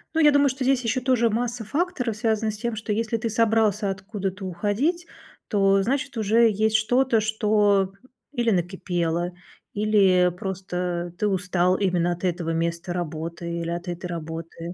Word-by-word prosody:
Ну, 325 - +3
я 295 -1 +7
думаю, 285 -1 +4
что 260 +1 -3
здесь 260 -1 +2
еще 240 +2 0
тоже 245 -3 +2
масса 235 +1 -2
факторов 260 - -1
связана 220 -1 0
с 210 - -8
тем, 235 +1 -3
что 215 0 -4
если 230 +1 -1
ты 225 +1 -2
собрался 220 -2 +2
откуда-то 195 -1 -4
уходить, 215 - -1 0.4
то, 195 -2 +3
значит, 265 +2 -2
уже 225 +2 +4
есть 220 +1 +1
что-то, 245 +2 +2
что 210 -3 +2 0.4
или 240 -4 +1
накипело, 175 -1 -1 0.4
или 195 -4 +3
просто 180 -3 -3
ты 210 - +1
устал 180 -1 +1
именно 180 -3 +1
от 175 +1 -5
этого 175 -2 -1
места 170 +1 -2
работы, 170 0 -4
или 165 - -3
от 175 +1 -4
этой 175 +1 -5
работы. 165 0 -6
205 Hz, 160 wpm, -24 LUFS, 180-230 Hz, 0.4 s, я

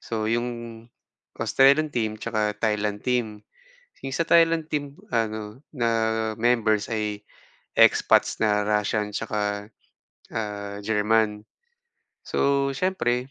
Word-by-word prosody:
So 110 -2 -3
'yung 120 +2 0 0.9
Australian 140 +3 +3
team 110 -3 -1
'tsaka 105 -2 -2
Thailand 105 -1 -1
team. 110 -4 -1 0.6
Yung 135 0 -4
sa - - +1
Thailand 165 -1 +3
team 145 -2 -3 0.2
ano 110 0 -2
na 120 -3 0 0.5
members 110 -3 +2
ay 105 -2 -3 0.5
expats - - +4
na 105 -1 +2
Russian 105 0 0
'tsaka, 105 0 -3 0.6
ah, 105 -2 -4
German. 105 0 +1 0.8
So, 140 0 +1
siyempre 130 -8 -1
110 Hz, 105 wpm, -25 LUFS, 105-125 Hz, 0.9 s, expats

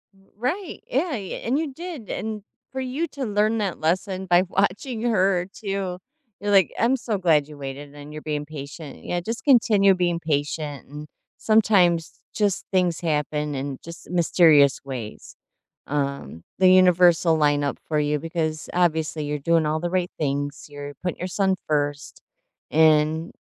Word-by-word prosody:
R - - -25 0.2
right. 315 - -3
Yeah, 315 +7 0
y 205 -9 -5
and 245 +5 +1
you 305 -3 -2
did, 325 - -8
and 215 -2 -4 0.3
for 265 - -4
you 265 +6 -2
to 280 -3 -5
learn 210 +1 +1
that 195 -5 -2
lesson 185 +4 -1
by 175 0 +4
watching 205 +6 -1
her 190 -6 +2
too, 195 -3 -3 0.4
you're 205 +1 -2
like 195 -4 +5
I'm 240 +3 +3
so 230 -4 -2
glad 160 -6 +3
you 150 -1 -12
waited 140 +1 -7
and 145 +1 -10
you're 155 - -7
being 150 -1 -3
patient. 145 0 -9
Yeah, 175 - -2
just 225 +6 -5
continue 215 -7 +5
being 175 -2 0
patient 145 -2 -3
and 150 +2 -9 0.3
sometimes, 195 -7 +3
just 205 -3 0
things 180 -4 +1
happen 150 -2 -1
in 135 0 -4
just 170 0 -11
mysterious 160 -5 +4
ways. 125 -6 -7 0.5
Um, 140 - -3 0.2
the 185 -1 +6
universe'll 180 -3 +5
lineup 145 -2 +1
for 155 -1 +1
you, 150 0 +1
because, 160 -1 -3
obviously, 160 -3 0
you're 150 0 -3
doing 165 +2 +2
all 155 +1 0
the 175 - -1
right 180 -1 0
things, 145 -1 -2
you're 145 0 -8
putting 180 - -3
your 180 - -3
son 190 +1 +1
first, 145 -1 -2 0.5
and, 155 +1 +3
170 Hz, 160 wpm, -24 LUFS, 150-200 Hz, 0.5 s, the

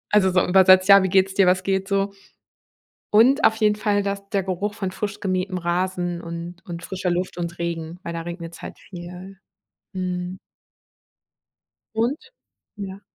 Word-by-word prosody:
also, 195 -3 +4
so 180 0 +2
übersetzt: 185 +1 +6
„Ja, 200 -1 +9
wie 190 - +1
geht's 190 +1 +3
dir? 195 -2 +4
Was 185 +1 +3
geht 195 0 0
so?“ 195 0 0 1.0
Und 255 +8 +5
auf 220 - +5
jeden 210 -1 +2
Fall 205 -1 +1
das 200 0 -4
der 200 -2 +1
Geruch 195 +3 -3
von 195 -3 -3
frisch 205 +1 -5
gemähtem 185 -1 -1
Rasen 175 0 -1
und 170 +1 -7
und 170 -1 -7
frischer 185 0 -3
Luft 180 0 -2
und 170 0 -4
Regen, 170 0 -4
weil 170 - -5
da 165 0 -4
regnet's 170 0 -8
halt - - -8
viel. 180 +1 -10 0.6
Mhm. 180 0 -3 1.6
Und 235 +7 +1 0.6
ja. 200 -1 -7
185 Hz, 160 wpm, -23 LUFS, 175-200 Hz, 1.6 s, Ja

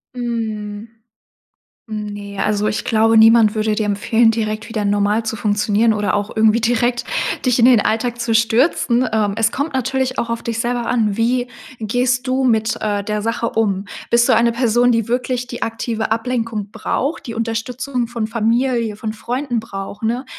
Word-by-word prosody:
Mhm. 220 -3 -4 1.0
Ne, 205 -2 -6
also 210 +1 0
ich 215 - -2
glaube, 225 0 +3
niemand 225 -1 +6
würde 215 -1 0
dir 215 - -1
empfehlen, 225 +3 +2
direkt 215 0 -3
wieder 220 -2 -2
normal 205 +2 +1
zu 225 0 -3
funktionieren 210 +1 +1
oder 205 -2 0
auch 205 0 -3
irgendwie 220 +1 +4
direkt 240 +1 +1 0.4
dich 250 -1 +2
in 230 - +6
den 250 -3 +6
Alltag 235 +3 -1
zu 235 -1 -1
stürzen. 235 +2 +2
Ähm, 210 -2 +1
es 225 0 +2
kommt 285 +3 -3
natürlich 260 0 -1
auch 230 0 -2
auf 230 - -3
dich 230 -1 -4
selber 240 0 -1
an, 220 -5 +1
wie 245 +2 +1 0.3
gehst 245 +4 0
du 260 +1 0
mit, 220 -3 +2
äh, 205 -2 -1
der 210 +1 -2
Sache 230 +1 -1
um? 200 -3 0 0.2
Bist 235 0 +4
du - - +4
eine 235 0 +3
Person, 240 0 +2
die 230 -2 0
wirklich 250 +1 -1
die 240 -1 -8
aktive 225 -1 -3
Ablenkung 225 -3 -2
braucht, 270 +8 -3
die 230 - -5
Unterstützung 235 +3 -2
von 230 -2 -3
Familie, 230 0 0
von 215 +1 -5
Freunden 245 +2 -3
braucht, 200 -2 -7
ne? 235 +4 -1
225 Hz, 175 wpm, -19 LUFS, 215-240 Hz, 1.0 s, niemand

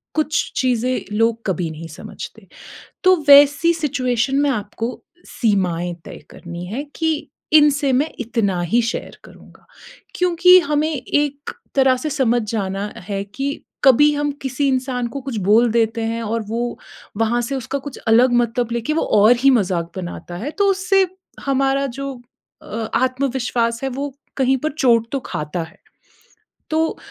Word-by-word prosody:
कुछ 310 -1 0
चीज़ें 250 -4 0
लोग 230 0 +2
कभी 175 -3 -1
नहीं 160 +1 -8
समझते। - - -10 0.6
तो 370 0 +6
वैसी 290 +3 +7
सिचुएशन 270 -4 0
में 290 -1 +2
आपको 225 0 -3 0.5
सीमाएँ 180 -6 +1
तय - - -9
करनी 175 0 -8
हैं 240 +10 -4
कि 320 -1 +1 0.4
इनसे 285 -2 +5
मैं 290 +5 +1
इतना 215 -7 -1
ही 230 +8 +2
शेयर - - -7
करूँगा। - - -17 0.5
क्योंकि 360 0 +6
हमें 300 +2 +1
एक 285 +2 -2 0.3
तरह 265 -1 +4
से 305 - -1
समझ 245 -4 +1
जाना 200 -1 -3 0.2
है 200 0 -2
कि 275 +8 -4 0.2
कभी 285 +3 +6
हम 290 0 -1
किसी 265 +2 -1
इंसान 255 -2 -1
को 275 +4 -6
कुछ 260 -4 -5
बोल 230 +3 +5
देते 230 0 +1
हैं 230 +1 -2
और 225 +1 -2
वो 235 +2 -3 0.4
वहाँ 225 +2 +1
से 275 +4 -3
उसका 265 +2 -3
कुछ 280 0 -9
अलग 245 +3 +5
मतलब 240 0 0
लेके, 235 +5 -1
वो 325 - +1
और 210 +3 +5
ही 275 +1 +5
मज़ाक 180 -8 +1
बनाता 175 -1 -6
है। 250 +10 -4
तो 405 - +3
उससे 385 0 +2 0.4
हमारा 275 0 +1
जो 275 +2 -5 0.5
अ, - - -15 0.3
आत्मविश्वास 250 -2 0
है, - - 0
वो 275 +1 -5 0.2
कहीं 265 0 +3
पर 310 +3 -2
चोट 230 -5 +3
तो 275 - -1
खाता 150 +3 -4
है। 160 - -17 0.9
तो 320 +1 0
250 Hz, 155 wpm, -20 LUFS, 225-280 Hz, 0.9 s, वैसी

